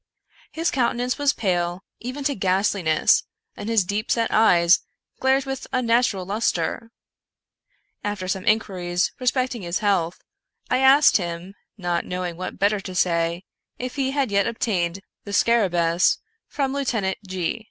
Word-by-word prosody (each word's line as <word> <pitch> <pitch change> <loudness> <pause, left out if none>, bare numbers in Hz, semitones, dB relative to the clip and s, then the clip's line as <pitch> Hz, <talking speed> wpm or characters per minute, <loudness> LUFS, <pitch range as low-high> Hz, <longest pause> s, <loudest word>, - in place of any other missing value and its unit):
His 330 +2 -1
countenance 245 0 0
was 285 -1 +3
pale 180 -5 -1 0.2
even 255 +4 -5
to 285 +1 +1
ghastliness, 190 - +2 0.3
and 210 - -6
his 225 -4 +3
deep 205 +5 -3
set 230 -1 +1
eyes 175 -5 +5 0.4
glared 265 +1 +2
with 270 -1 -5
unnatural 235 -6 +1
luster. 225 +2 -1 1.1
After 205 -3 -3
some 190 0 -3
inquiries 185 -5 +1
respecting 250 -2 0
his 175 0 -2
health, 190 -5 0 0.5
I 255 - +3
asked 275 +2 +6
him, 175 0 -5 0.2
not 175 -3 -1
knowing 180 -1 -4
what 185 +2 -6
better 205 +1 +2
to 190 -1 -8
say, 170 0 +1 0.3
if 250 0 -5
he 270 -2 0
had 270 -4 -1
yet 200 0 +2
obtained 195 -6 -1 0.2
the 205 - -8
^scarabcEus 180 -5 +3 0.3
from 275 -2 -2
Lieutenant 230 -9 -1
G 185 +3 -2
205 Hz, 140 wpm, -23 LUFS, 180-245 Hz, 1.1 s, asked